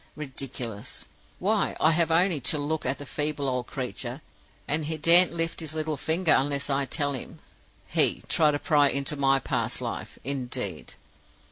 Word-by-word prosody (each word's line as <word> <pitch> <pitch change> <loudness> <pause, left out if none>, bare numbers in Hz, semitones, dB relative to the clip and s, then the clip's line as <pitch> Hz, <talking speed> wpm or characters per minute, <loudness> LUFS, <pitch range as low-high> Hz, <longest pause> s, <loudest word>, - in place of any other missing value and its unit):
Ridiculous! 130 -7 -6 0.3
Why, - - 0
I 160 - +4
have 165 +1 +2
only 170 0 +3
to 150 - +1
look 150 +2 -2
at 135 - 0
the 145 - -9
feeble 145 0 -1
old 125 -2 -2
creature, 130 +1 -5 0.4
and 150 +2 0
he 160 +1 -2
daren't 170 +4 +7
lift 165 -1 -1
his 160 -2 -4
little 155 -1 -1
finger 160 +4 +2
unless 140 +1 0
I 140 0 +1
tell 145 +2 -1
him. 130 - -6 0.5
He - - +2
try 155 -2 +3
to 145 - 0
pry 145 -1 +3
into 140 +2 0
my 135 -1 +3
past - - -2
life, - - -6
indeed! 125 - -3
145 Hz, 165 wpm, -26 LUFS, 135-160 Hz, 0.5 s, daren't